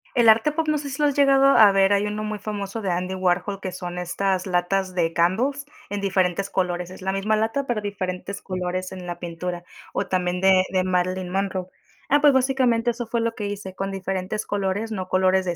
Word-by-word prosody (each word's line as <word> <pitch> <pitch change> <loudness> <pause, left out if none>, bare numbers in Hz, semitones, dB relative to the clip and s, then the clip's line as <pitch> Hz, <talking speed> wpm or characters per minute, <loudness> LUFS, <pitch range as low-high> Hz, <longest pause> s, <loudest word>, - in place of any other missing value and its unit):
El 235 -2 +4
arte 225 +7 +5
pop 315 +1 -2
no 305 - +2
sé 285 -1 -5
si 270 +2 -5
lo 295 - +5
has 285 - -1
llegado 275 -1 +5
a 220 -7 +7
ver, 195 +1 +4
hay 200 +1 +2
uno 210 +1 -3
muy 215 0 -3
famoso 205 +1 -5
de 190 -3 -1
Andy 180 +2 -2
Warhol, 185 +2 0
que 185 - -4
son 180 0 -6
estas 185 +1 -1
latas 185 +1 0
de 165 -2 0
Candles 245 +13 +1 0.2
en 205 0 -3
diferentes 195 0 0
colores. 180 -2 -1
Es 190 - -11
la 190 +1 -1
misma 215 +2 +1
lata, 225 +6 0
pero 240 -5 -1
diferentes 200 -1 -4
colores 185 0 -3
en 185 -1 -8
la 175 - -5
pintura. 175 +1 -5 0.3
O - - -1
también 180 0 -1
de 190 -1 +5
de 185 -1 +1
Marilyn 185 0 -1
Monroe. 190 -1 -2 0.4
Ah, 290 - +5
pues 290 -1 +5
básicamente 255 -3 +2
eso 235 0 -6
fue 235 0 -1
lo 230 0 -1
que 205 -2 -4
hice 200 -2 -6
con 195 +1 -4
diferentes 195 +2 -3
colores, 205 +2 -2
no 185 -3 -4
colores 185 0 +2
de 175 -2 -1
195 Hz, 220 wpm, -23 LUFS, 185-220 Hz, 0.4 s, a